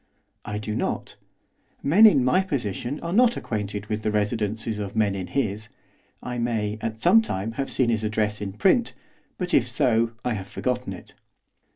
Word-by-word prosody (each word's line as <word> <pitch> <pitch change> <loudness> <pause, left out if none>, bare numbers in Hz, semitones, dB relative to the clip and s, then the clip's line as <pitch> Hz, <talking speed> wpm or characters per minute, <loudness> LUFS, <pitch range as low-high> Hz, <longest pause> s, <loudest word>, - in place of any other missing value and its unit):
'I 105 -1 -3
do 105 0 -4
not. - - -3 0.7
Men 205 +10 +7
in 140 -11 +4
my 180 +9 +4
position 135 - -3
are 170 +1 -3
not 240 +2 +4
acquainted 105 -2 -4
with 105 0 -3
the 110 - 0
residences 105 +1 -1
of 100 0 -5
men 105 -3 +2
in 95 -2 -4
his. 110 -5 -2 0.5
I 125 -1 -4
may, 110 -3 -1
at 110 0 -4
some 225 - +7
time, 105 - -3
have 135 +3 -3
seen 125 -3 +2
his 110 -2 0
address 105 -1 -1
in 100 -2 -4
print; 195 - +2 0.4
but, 180 -1 -4
if 125 - +4
so, 115 -1 +1
I 125 - +1
have 95 -2 -5
forgotten 125 -5 -2
it. 90 - -12
110 Hz, 180 wpm, -25 LUFS, 105-130 Hz, 0.7 s, Men